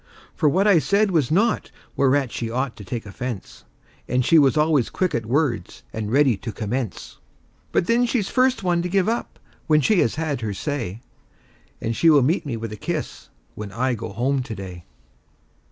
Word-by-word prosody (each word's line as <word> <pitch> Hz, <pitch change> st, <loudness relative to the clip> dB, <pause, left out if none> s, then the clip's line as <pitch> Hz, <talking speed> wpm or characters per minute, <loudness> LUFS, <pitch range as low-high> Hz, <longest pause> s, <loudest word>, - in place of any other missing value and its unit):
For 150 Hz, -, +2 dB
what 190 Hz, +7 st, +2 dB
I 200 Hz, -5 st, +6 dB
said 200 Hz, +5 st, +2 dB
was 155 Hz, -8 st, +2 dB
naught 210 Hz, +8 st, +1 dB, 0.3 s
whereat 135 Hz, -2 st, +2 dB
she 115 Hz, -, -3 dB
ought 125 Hz, +1 st, -2 dB
to 105 Hz, -, -9 dB
take 110 Hz, +4 st, -5 dB
offense; 110 Hz, -1 st, -7 dB, 0.4 s
And 125 Hz, -1 st, +1 dB
she 165 Hz, -, +6 dB
was 140 Hz, 0 st, +4 dB
always 150 Hz, -5 st, +3 dB
quick 185 Hz, -1 st, -1 dB
at 115 Hz, -2 st, -2 dB
words 135 Hz, -1 st, -1 dB
and 110 Hz, -1 st, -4 dB
ready 135 Hz, -2 st, +4 dB
to 115 Hz, +4 st, -6 dB
commence. 110 Hz, +1 st, -4 dB, 0.5 s
But -, -, +2 dB
then 240 Hz, +4 st, +3 dB
she's 230 Hz, -5 st, 0 dB
first 255 Hz, -3 st, +2 dB
one 175 Hz, -2 st, +2 dB
to 180 Hz, -, -3 dB
give 195 Hz, +1 st, +2 dB
up 230 Hz, +2 st, -2 dB, 0.3 s
when 155 Hz, -1 st, +5 dB
she 200 Hz, +5 st, +3 dB
has 115 Hz, -, +2 dB
had 155 Hz, -5 st, -2 dB
her 105 Hz, -3 st, -3 dB
say; 120 Hz, -, -4 dB, 0.8 s
And 115 Hz, +1 st, -2 dB
she 165 Hz, -, +4 dB
will 145 Hz, -4 st, +6 dB
meet 155 Hz, +3 st, +1 dB
me 120 Hz, -5 st, -3 dB
with 115 Hz, -1 st, -5 dB
a 105 Hz, -, -7 dB
kiss, -, -, -5 dB, 0.2 s
when 105 Hz, -1 st, -7 dB
I 125 Hz, +5 st, 0 dB
go 115 Hz, -1 st, -5 dB
home 130 Hz, +7 st, 0 dB
to 120 Hz, -3 st, -6 dB
day. 90 Hz, -3 st, -8 dB
135 Hz, 195 wpm, -23 LUFS, 115-165 Hz, 0.8 s, I